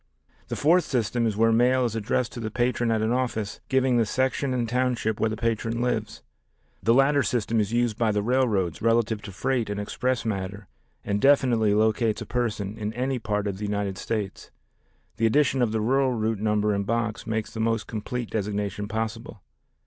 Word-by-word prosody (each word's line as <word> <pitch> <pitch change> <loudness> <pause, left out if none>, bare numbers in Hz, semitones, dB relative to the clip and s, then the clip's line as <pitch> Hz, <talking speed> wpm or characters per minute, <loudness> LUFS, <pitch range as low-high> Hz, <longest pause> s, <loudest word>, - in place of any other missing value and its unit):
The - - -3
fourth 170 +3 +3
system 120 -1 0
is 105 -2 -2
where 115 +1 +4
mail 125 +2 +3
is 115 -2 -2
addressed 115 +3 -1
to - - -7
the 110 -2 -3
patron 120 0 0
at 110 -1 +1
an 110 - +1
office 120 -5 -2
giving 130 -2 +3
the 115 - +3
section 130 +3 0
and 120 -2 0
township 120 -3 0
where 110 - +2
the 110 - -4
patron 115 0 -1
lives. 120 -3 -2 0.6
This 115 +2 +3
latter 140 +2 +4
system 115 -1 0
is 105 0 0
used 120 -1 0
by 115 -2 +3
the 105 0 0
railroads 110 -8 +1
relative 115 -1 +2
to 100 - -8
freight 120 +4 -1
and 105 0 -3
express 125 +3 -1
matter 100 -1 -4 0.4
and 100 0 -1
definitely 120 -7 +4
locates 110 0 +2
a - - -10
person 110 -4 -2
in 105 0 -2
any 130 +2 -1
part 105 -2 -2
of 100 -2 -3
the 105 - -3
United 100 -2 -2
States. 105 -4 -4 0.7
The 115 - +3
addition 135 +1 +2
of 120 -3 +2
the 110 0 0
rural 130 +3 +2
route 110 -2 -1
number 105 0 +1
and 100 0 0
box 115 +1 -2
makes 110 -1 -2
the 110 - -6
most 115 -1 0
complete 115 +2 -5
designation 105 -1 -2
possible. 110 -1 -4
115 Hz, 195 wpm, -25 LUFS, 105-125 Hz, 0.7 s, where